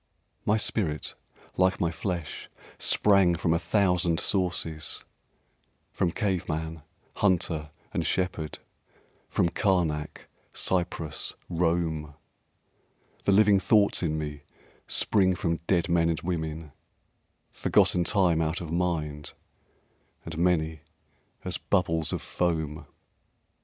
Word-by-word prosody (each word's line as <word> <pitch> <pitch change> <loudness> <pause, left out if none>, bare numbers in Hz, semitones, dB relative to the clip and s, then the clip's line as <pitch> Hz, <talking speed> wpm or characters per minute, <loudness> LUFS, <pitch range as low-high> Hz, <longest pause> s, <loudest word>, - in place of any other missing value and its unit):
My 105 - +3
spirit 90 -8 -1 0.4
like 95 +1 +3
my 85 -4 +1
flesh 85 -3 -4 0.3
Sprang 100 -4 +4
from 85 -1 +1
a 85 - +2
thousand 90 -2 +2
sources, 85 -5 -1 0.9
From 90 - +1
cave 95 -2 -1
man, 80 0 -3 0.4
hunter 85 -6 +1 0.2
and - - 0
shepherd, 90 -4 -1 0.7
From 85 - +2
Karnak, 85 -7 0 0.3
Cyprus, 85 -4 -1 0.2
Rome; 80 -3 0 1.1
The - - +4
living 100 0 +6
thoughts 100 +1 +3
in 80 -3 0
me 75 -2 -5 0.5
Spring 95 -3 +3
from 85 -2 -1
dead 85 -3 +2
men 85 -1 +3
and 80 - 0
women, 80 -3 -3 0.8
Forgotten 90 - +3
time 85 -3 +3
out 80 +1 -1
of 85 -3 -6
mind 80 -4 -2 0.9
And 80 - -6
many 80 -3 +1 0.6
as - - -3
bubbles 80 -5 0
of - - -3
foam. 80 -3 -2
85 Hz, 105 wpm, -27 LUFS, 80-90 Hz, 1.1 s, living